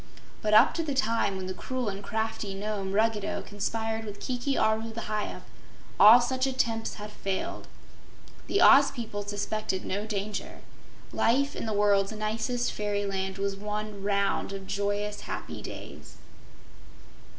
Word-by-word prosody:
But 215 -1 +3
up 235 +7 +7
to 330 - -1
the 290 -3 -2
time 225 -6 +1
when 190 - -4
the 185 - -3
cruel 255 +4 -3
and 200 0 -4
crafty 220 -2 -2
Nome, 200 -1 -3
Ruggedo, 215 0 +1
conspired 225 +2 -2
with 205 -2 -7
Kiki 255 +2 -2
Aru, 220 +1 +1
the 230 +1 -5
Hyup, 215 -1 -3 0.6
all 220 +4 +10
such 260 +2 0
attempts 230 -4 -1
had 210 0 -8
failed. 195 -2 -4 0.8
The 395 - +3
Oz 280 +1 +8
people 220 -5 -5
suspected 205 -1 -3
no 205 +3 -2
danger. 205 -1 -4 0.5
Life 275 +5 +2
in - - -4
the - - -1
world's 205 0 +3
nicest 220 +3 -1
fairyland 200 -2 -2
was 200 0 -1
one 210 0 -4
round 200 0 0
of 195 -1 -6
joyous, 205 +1 -2
happy - - -6
days. - - -9
210 Hz, 145 wpm, -28 LUFS, 200-225 Hz, 0.8 s, all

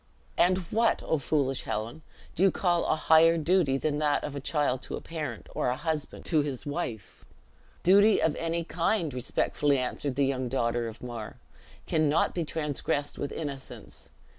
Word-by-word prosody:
'" - - -32
"And 185 +1 +2
what, 230 +1 +2
O 160 - 0
foolish 135 -2 0
Helen, 115 +8 -4 0.3
do - - -4
you 195 - +7
call 175 -2 +1
a - - +3
higher 160 +1 +5
duty 160 -4 +2
than 145 +1 -1
that 150 -1 +1
of 145 - -5
a - - -3
child 140 -2 0
to - - -5
a - - -5
parent, 150 -9 -6
or - - 0
a 125 - 0
husband 155 +1 -4
to 155 -3 +3
his 140 -4 -4
wife?" 130 - -5 0.6
"Duty 200 +4 +6
of 160 - +1
any 165 0 -1
kind," 170 - 0
respectfully 140 +3 0
answered 130 +1 -2
the 140 0 +2
young 130 -2 -1
daughter 120 -2 0
of 115 +1 -9
Mar, 120 -3 -6 0.5
"cannot 155 0 +2
be 175 - -1
transgressed 150 -2 -2
with 145 - -3
innocence. 140 -4 -7
150 Hz, 175 wpm, -28 LUFS, 130-165 Hz, 0.6 s, you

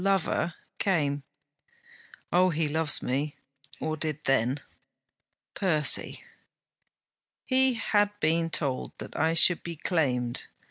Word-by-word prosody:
lover 195 -3 0 0.2
came. 145 -7 +1 1.1
Oh! 180 +1 +4
he 160 -2 0
loves 155 0 0
me, 140 +3 -2 0.4
or 155 0 -2
did 155 -1 -2
then. 135 +1 +1 0.9
Percy! 155 -6 +2 1.2
He 260 -1 +2
had 205 -2 +2
been 165 0 +1
told 140 -5 -2
that - - -9
I 160 +2 +1
should 175 +1 +6
be 170 -1 -6
claimed. 130 -8 -1
160 Hz, 105 wpm, -27 LUFS, 145-180 Hz, 1.2 s, should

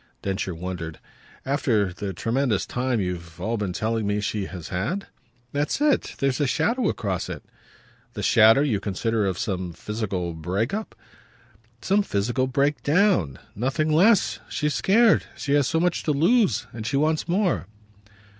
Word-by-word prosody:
Densher 95 -2 -2
wondered. 85 -2 -5 0.5
"After 115 - +1
the 100 +2 -4
tremendous 115 +3 0
time 125 -1 -1
you've 85 -3 -4
all 115 +2 -1
been 105 -4 -2
telling 110 +3 -1
me 105 0 0
she 105 -1 -2
has 90 -4 -8
had?" 125 - -2 0.5
"That's 145 - -1
it. 295 -1 +1
There's 135 +1 0
a 145 - +2
shadow 235 - +1
across 95 -5 -2
it." - - -6 0.7
"The - - -5
shadow, 110 +4 +6
you 130 -9 +1
consider, 105 +2 -1
of 95 -2 -2
some 95 -5 -3
physical 95 -4 -3
break 90 - -2
up?" 215 +1 -4 0.9
"Some 200 +2 +3
physical 120 - 0
break 140 +3 +1
down. 145 - +2 0.2
Nothing 135 +7 0
less. 200 +6 +4
She's 150 0 -1
scared. 225 +3 +4
She 140 - -1
has 145 -3 +3
so 160 - +1
much 175 0 +1
to 155 - +2
lose. 175 - +3
And 110 -1 -5
she 140 - 0
wants 155 +2 +1
more." 185 +1 0
115 Hz, 155 wpm, -24 LUFS, 95-150 Hz, 0.9 s, shadow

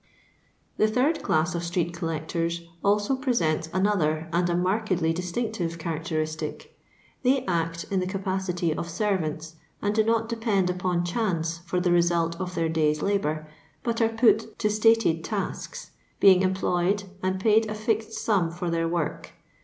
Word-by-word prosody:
Tlie 215 - +4
third 270 +8 +1
class 160 +3 +1
of 170 0 -2
street 170 0 -1
collectors 165 +1 -2 0.2
also 205 +5 +2
presents 170 - 0
another 170 -5 +1
and 175 +1 +2
a 175 - +1
markedly 185 -3 +1
distinctive 180 -1 -3
characteristic. 155 -1 -4 0.5
They 265 +1 +2
act 165 -2 -1
in 195 - +2
the 185 - -1
capacity 185 -3 -1
of 170 - -4
servants, 165 -4 -2 0.2
and 205 0 0
do 220 0 +3
not 225 0 +1
depend 220 -5 +1
upon 180 -1 -1
chance 170 -4 -1
for 180 +1 0
the 180 0 +1
result 170 -1 +2
of 180 -1 -4
their 165 -1 +1
day's 155 -2 +1
labour, 155 -6 0 0.4
but 235 -1 -1
are 225 - +4
put 225 -1 +2
to 210 -2 +1
stated 215 -6 +3
tasks, 200 -2 -4 0.3
being 190 -2 +7
employed 190 +1 +1 0.2
and 185 0 -1
paid 220 +2 +3
a 215 - -3
fixed 220 0 -1
sum 205 -6 +1
for 175 +1 -4
their 165 0 0
work. 165 -3 -3
180 Hz, 155 wpm, -26 LUFS, 165-215 Hz, 0.5 s, being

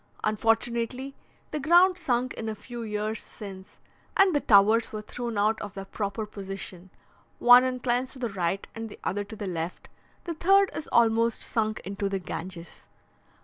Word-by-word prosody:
Unfortunately, 230 +4 0 0.4
the 300 - -2
ground 350 +5 +5
sunk 255 -7 -1
in 225 -1 -5
a 215 - -4
few 235 +3 -8
years 215 0 -3
since, 195 -1 -10 0.4
and 390 -2 +5
the 290 - +3
towers 220 0 +4
were 215 -1 -5
thrown 235 0 -5
out 215 +2 +2
of 205 -2 -7
their 195 0 -6
proper 200 +2 -3
position: 195 -3 -8 0.5
one 245 +1 +8
inclines 255 0 0
to - - -8
the 245 -2 -2
right 190 -1 -2
and 225 0 -6
the - - -11
other 205 +1 -1
to 210 +2 -10
the 210 - -5
left; 170 -1 -5 0.3
the 340 - -4
third 390 +4 +4
is 310 - -5
almost 230 0 +3
sunk 215 -2 -1
into 200 +1 -3
the 195 - -1
Ganges. 175 -1 -8
220 Hz, 170 wpm, -27 LUFS, 200-245 Hz, 0.5 s, one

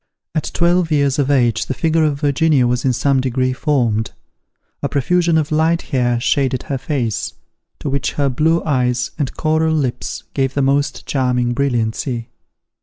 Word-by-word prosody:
At 155 -2 -2
twelve 175 0 +2
years 140 -2 +1
of 140 -1 +1
age 120 -5 +2
the 130 - -2
figure 160 +1 +1
of 145 -2 -1
Virginia 145 -2 +3
was 120 0 0
in 130 - +3
some 130 +2 +1
degree 130 0 0
formed: 120 -7 0 0.7
a - - -1
profusion 170 +4 +2
of 155 -1 -1
light 160 +2 +2
hair 120 -2 +2
shaded 130 0 0
her 135 -2 -3
face, 130 -6 -2 0.5
to - - -4
which 140 -1 -1
her 140 -1 +1
blue 155 +6 +1
eyes 125 -4 0
and 140 -4 -1
coral 160 0 +1
lips 135 -6 -2
gave 135 -1 -1
the 140 - +1
most 140 +1 0
charming 125 -3 0
brilliancy. 120 -2 -1
140 Hz, 165 wpm, -18 LUFS, 125-155 Hz, 0.7 s, Virginia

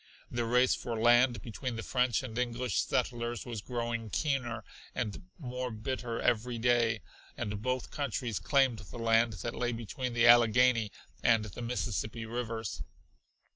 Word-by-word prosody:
The 120 -1 -1
race 125 +2 +4
for 115 -2 -3
land 120 0 +4
between 120 +1 -4
the 115 - -4
French 125 -2 +1
and 120 -4 -6
English 125 -2 0
settlers 120 -2 -1
was 115 -4 -5
growing 115 -1 -3
keener 125 -5 -1 0.3
and 125 - -4
more 125 -4 -4
bitter 115 +1 -3
every 120 +1 +1
day, 115 -2 +2 0.4
and 105 0 -3
both 130 +2 -2
countries 130 -6 -2
claimed 135 -5 +3
the 105 +3 -10
land 115 0 +3
that - - -2
lay 120 0 -1
between 120 +2 -4
the 120 0 +4
Allegheny 120 -1 +6 0.3
and 115 -2 +4
the 110 +3 -8
Mississippi 115 -1 -2
rivers. 115 -6 -4
120 Hz, 145 wpm, -31 LUFS, 115-125 Hz, 0.4 s, Allegheny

